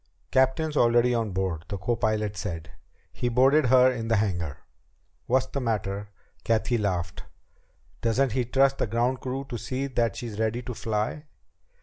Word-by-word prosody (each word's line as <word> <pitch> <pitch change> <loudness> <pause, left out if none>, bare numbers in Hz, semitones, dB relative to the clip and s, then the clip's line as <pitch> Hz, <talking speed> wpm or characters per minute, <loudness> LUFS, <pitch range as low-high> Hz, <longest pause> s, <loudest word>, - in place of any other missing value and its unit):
"Captain's 130 +4 +2
already 120 -1 +4
on 115 -2 0
board," 95 -4 -2
the 100 - -4
copilot 105 0 -1
said. 85 -3 -5 0.4
"He 120 - -1
boarded 135 +4 +4
her 130 +1 +6
in 115 -3 -4
the 115 - +2
hangar." 90 -8 -1 0.7
"What's 130 +1 +3
the 140 +1 -4
matter?" 105 -3 -2 0.3
Cathy 115 +1 +1
laughed. 90 -5 -2 0.8
"Doesn't 120 +3 +2
he 125 +3 +1
trust 135 +2 +2
the - - +1
ground 120 +4 0
crew 135 +2 -4
to 120 -4 -5
see 130 +6 -3
that 120 -6 0
she's 110 -4 -6
ready 110 +2 0
to 125 - -5
fly?" 110 +7 -2
115 Hz, 155 wpm, -26 LUFS, 105-130 Hz, 0.8 s, her